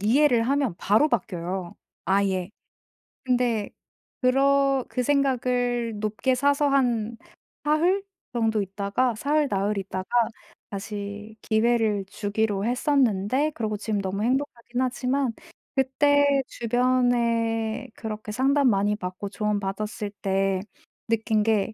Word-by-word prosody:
이해를 240 +3 +4
하면 270 -3 +1
바로 215 +10 +3
바뀌어요 185 - -3 0.3
아예. 190 -1 +1 0.7
근데 245 -4 +1 0.5
그러 275 +1 +3
그 250 - -1
생각을 245 -4 +1
높게 215 +5 0
사서 285 +2 +2
한 235 -5 +1 0.5
사흘? 340 +7 +2 0.3
정도 225 -3 +1
있다가 200 +6 -1
사흘, 290 +6 +1
나흘 200 +1 0
있다가 190 -1 -5 0.6
다시 205 +1 -6
기회를 220 -2 +2
주기로 205 0 -1
했었는데 255 +1 +1
그러고 220 -6 -3
지금 210 0 -2
너무 195 +1 -3
행복하긴 250 -1 -1
하지만 255 0 0 0.4
그때 285 +1 +3
주변에 235 -1 +1
그렇게 215 -1 -6
상담 270 +4 +3
많이 205 0 +2
받고 185 0 -5
조언 210 0 -1
받았을 205 +1 -4
때 195 -1 +1 0.5
느낀 220 -1 +1
게 220 -1 +1
230 Hz, 245 characters per minute, -25 LUFS, 205-260 Hz, 0.7 s, 이해를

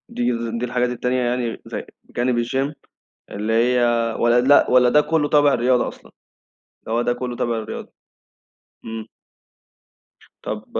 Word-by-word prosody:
دي - - -3 0.4
دي 125 - -1
الحاجات 125 0 0
التانية 125 +1 -1
يعني 120 -1 -2
زي - - -6 0.2
جانب 120 -1 0
الgym 135 +4 -1 0.6
اللي 105 +2 -2
هي 125 +2 +3 0.4
والّا 120 +1 +4
لأ، 140 +3 +5
والّا 125 -1 +5
ده 150 +4 +5
كلّه 150 -1 0
تابع 145 -1 +4
الرياضة 125 +1 +2
أصلًا، - - -11 0.8
هو 115 +1 +1
ده 120 - +1
كلّه 125 0 -5
تابع 120 -1 -1
للرياضة، 110 - -7 0.9
إمم. 110 -1 -6 1.4
طب - - -5
125 Hz, 140 wpm, -21 LUFS, 120-130 Hz, 1.4 s, لأ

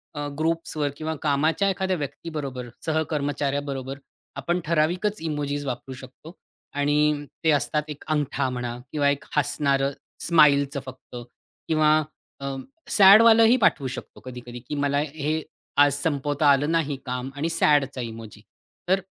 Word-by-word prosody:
अ, 145 0 -3
ग्रुप्सवर 160 -2 -1
किंवा 160 0 -3
कामाच्या 155 +6 +1
एखाद्या 190 -1 -1
व्यक्तीबरोबर, 140 -3 -5 0.2
सहकर्मचाऱ्याबरोबर 145 -3 -2 0.4
आपण 175 +6 -1
ठराविकच 175 +6 0
इमोजीज 145 -2 -3
वापरू 130 +1 -5
शकतो. 130 +5 -12 0.4
आणि 145 +1 +1 0.2
ते 160 - +4
असतात 150 +2 0
एक 150 - -8
अंगठा 145 -4 0
म्हणा 120 -1 -4
किंवा 145 -2 +2
एक 140 0 -2
हसणारं 140 -1 +1 0.4
स्माईलचं 140 -3 +4
फक्त 130 -1 -11 0.5
किंवा 155 -1 +3 0.5
अ, 140 -1 -4 0.3
सॅडवालंही 225 +4 +7
पाठवू 145 - +2
शकतो 130 - -8
कधी-कधी, 120 -1 -8
की 130 +5 -6
मला 145 0 +1
हे 155 +1 -2 0.4
आज 145 -1 +6
संपवता 145 0 0
आलं 145 +3 +2
नाही 155 -4 0
काम 125 +1 -3
आणि 155 +4 -2
सॅडचा 145 -5 +2
इमोजी 115 -2 -8 0.5
तर 190 +1 +4
145 Hz, 130 wpm, -24 LUFS, 135-160 Hz, 0.5 s, सॅडवालंही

